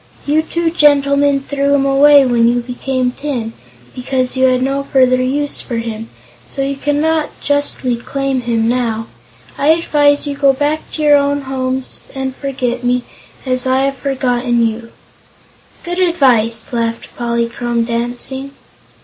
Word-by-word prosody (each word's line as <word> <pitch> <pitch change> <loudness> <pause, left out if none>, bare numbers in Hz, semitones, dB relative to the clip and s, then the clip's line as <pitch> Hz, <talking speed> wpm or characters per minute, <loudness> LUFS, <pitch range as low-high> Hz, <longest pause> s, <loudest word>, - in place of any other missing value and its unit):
You 300 +2 +2
two 335 +1 -2
gentlemen 285 -2 +3
threw 280 0 0
him 275 -1 +1
away 280 +1 +6
when 235 -2 +3
you 240 +1 +2
became 250 +1 -2
tin, 250 -5 -4 0.4
because 255 0 -1
you 260 0 +3
had 255 0 +2
no 275 +1 0
further 255 -2 +2
use 285 +3 -1
for 240 - -5
him, 225 -1 -5 0.4
so 275 - -3
you 275 +1 -2
cannot 300 +3 -1
justly 285 -4 0
claim 270 +2 -2
him 230 -2 0
now. 230 -2 -1 0.5
I 285 - +1
advise 295 -3 +3
you 285 - -2
to 280 - -13
go 275 -1 +5
back 295 +3 -2
to 310 - -3
your 295 -1 +6
own 285 0 0
homes 260 -1 -3
and 265 -1 -3
forget 255 -3 -3
me, 245 0 +1 0.4
as 255 0 -1
I 260 +1 +2
have 275 0 0
forgotten 245 -3 0
you." 230 +1 -4 0.9
"Good 350 +1 -4
advice!" 250 -11 +2
laughed 230 -1 -3
Polychrome, 235 0 -1
dancing. 245 +4 -3
265 Hz, 150 wpm, -16 LUFS, 245-285 Hz, 0.9 s, away